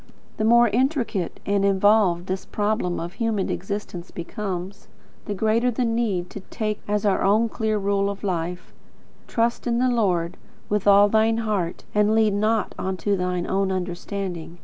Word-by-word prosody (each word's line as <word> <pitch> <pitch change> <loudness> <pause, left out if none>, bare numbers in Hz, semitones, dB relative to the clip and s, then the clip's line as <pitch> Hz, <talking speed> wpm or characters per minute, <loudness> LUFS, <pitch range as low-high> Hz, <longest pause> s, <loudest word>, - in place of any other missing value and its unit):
The - - -1
more 235 +2 +6
intricate 240 - -1
and 200 0 +1
involved 195 -2 +3
this 185 0 -3
problem 205 -4 -1
of 170 +2 -5
human 225 -4 -1
existence 190 -2 -5
becomes, 190 +1 -5 0.4
the 205 - -3
greater 220 +4 +2
the 245 +1 -1
need 225 -6 -1
to - - -7
take 215 +2 -4
as 210 0 0
our 200 - +2
own 215 +4 +3
clear 220 -1 -1
rule 200 0 +1
of 200 0 -6
life: 180 -2 -3 0.5
"Trust 235 +1 0
in 235 -1 +1
the 255 +1 +2
Lord 180 -7 0 0.3
with 205 -1 0
all 200 0 +7
thine 220 +2 +2
heart; 210 -7 -2
and 210 +1 +3
lean 215 -2 +3
not 215 0 +1
unto 190 +2 -1
thine 180 -1 -1
own 195 0 0
understanding. 180 -1 -4
200 Hz, 160 wpm, -24 LUFS, 185-220 Hz, 0.5 s, all